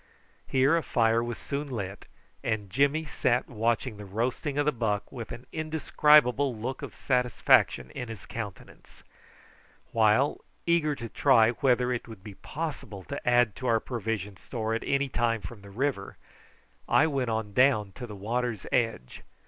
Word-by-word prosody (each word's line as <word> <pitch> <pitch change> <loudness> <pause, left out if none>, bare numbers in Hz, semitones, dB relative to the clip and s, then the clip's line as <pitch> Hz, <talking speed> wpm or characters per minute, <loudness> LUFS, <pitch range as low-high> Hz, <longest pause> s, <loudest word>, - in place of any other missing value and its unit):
Here 135 +4 +3
a 170 - +2
fire 115 -4 +2
was 120 -1 -4
soon 140 +1 -4
lit, 100 -6 -5 0.4
and 105 -4 -2
Jimmy 140 +7 +2
sat 125 -4 0
watching 115 0 -1
the 105 - -8
roasting 125 - -2
of 145 - +2
the 150 - +3
buck 110 -5 -2
with 120 -4 -7
an 120 - -8
indescribable 150 -4 +3
look 130 +5 -4
of - - -7
satisfaction 125 - +2
in 125 - -6
his 110 -3 -8
countenance; 110 -3 -9 0.9
while, 110 +5 +3 0.2
eager 165 -3 +2
to 115 - -6
try 115 -2 +4
whether 125 0 +2
it 120 - -4
would 110 -5 -11
be 105 - -9
possible 135 -7 -6
to 140 -3 -2
add 120 -4 +4
to 130 - -4
our 115 -2 +3
provision 110 -5 -4
store 110 +5 -3
at 115 - -1
any 140 0 +1
time 115 -3 0
from 110 -1 -9
the 100 - -13
river, 115 -1 -2 0.7
I 160 - +5
went 135 -6 -1
on 110 -2 -2
down 110 -5 +3
to 125 - -6
the 105 - -8
water's 115 +1 -2
edge. 115 - -1
120 Hz, 165 wpm, -28 LUFS, 110-135 Hz, 0.9 s, I